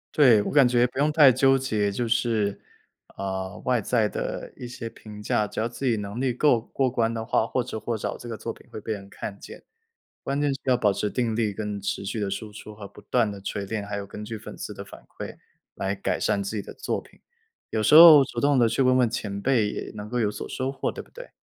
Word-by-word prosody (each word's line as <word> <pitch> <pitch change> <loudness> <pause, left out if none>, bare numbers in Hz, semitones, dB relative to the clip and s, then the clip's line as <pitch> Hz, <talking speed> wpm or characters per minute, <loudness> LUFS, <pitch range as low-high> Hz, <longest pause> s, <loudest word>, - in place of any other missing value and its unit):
对， 125 -8 +6
我 - - -3
感 140 -3 +6
觉 120 0 +3
不 125 - -13
用 150 +2 +2
太 150 -4 +7
纠 135 +2 +4
结， 110 -6 0
就 115 +4 -2
是， 110 -3 0 0.6
呃， 95 -1 -4
外 125 -1 +2
在 110 -1 +1
的 - - -4
一 125 - -7
些 120 -1 -7
评 105 -2 -12
价。 105 0 +1
只 - - -6
要 115 - 0
自 135 +3 -6
己 115 -3 +2
能 105 +3 -5
力 130 -2 0
够 125 -2 +3
过 130 +3 -1
关 115 -2 0
的 115 -1 -3
话， 115 -1 +1
或 125 +1 -1
迟 110 - -6
或 115 +2 -3
早 110 - -4
这 - - -10
个 115 - -4
作 115 - -5
品 - - -15
会 110 - -7
被 110 - -5
人 100 -2 -5
看 100 0 -7
见。 - - -11 0.6
关 140 +1 -1
键 145 -1 +2
是 135 - -4
要 130 -1 +3
保 105 -4 +2
持 105 +1 -2
定 115 -3 -1
力 110 -3 0
跟 105 0 -4
持 100 0 -3
续 100 +3 -3
地 100 -2 -2
输 105 +2 -5
出 105 +1 -10
和 105 -1 -9
不 105 - -16
断 110 +1 +1
地 100 - -8
锤 100 +1 -4
炼， 105 -1 -3
还 100 0 -4
有 100 -1 -6
根 105 +1 -8
据 110 +1 -5
粉 110 - -9
丝 - - -6
的 - - -8
反 - - -13
馈 - - -9 0.4
来 95 0 -2
改 100 - -2
善 100 - 0
自 100 +3 -4
己 105 - -1
的 - - -10
作 - - -3
品。 - - -19 0.5
有 110 - -1
时 - - +3
候 155 -3 +11
主 - - -5
动 140 -1 +3
地 120 - +5
去 115 +4 0
问 130 0 +4
问 125 -2 +4
前 105 -3 -4
辈 115 -1 +2
也 - - -6
能 105 0 -8
够 125 - -1
有 105 -3 +1
所 - - -7
收 130 +1 -2
获， 140 - -2
对 - - -8
不 - - -25
对？ - - -10
115 Hz, 285 characters per minute, -25 LUFS, 105-125 Hz, 0.6 s, 候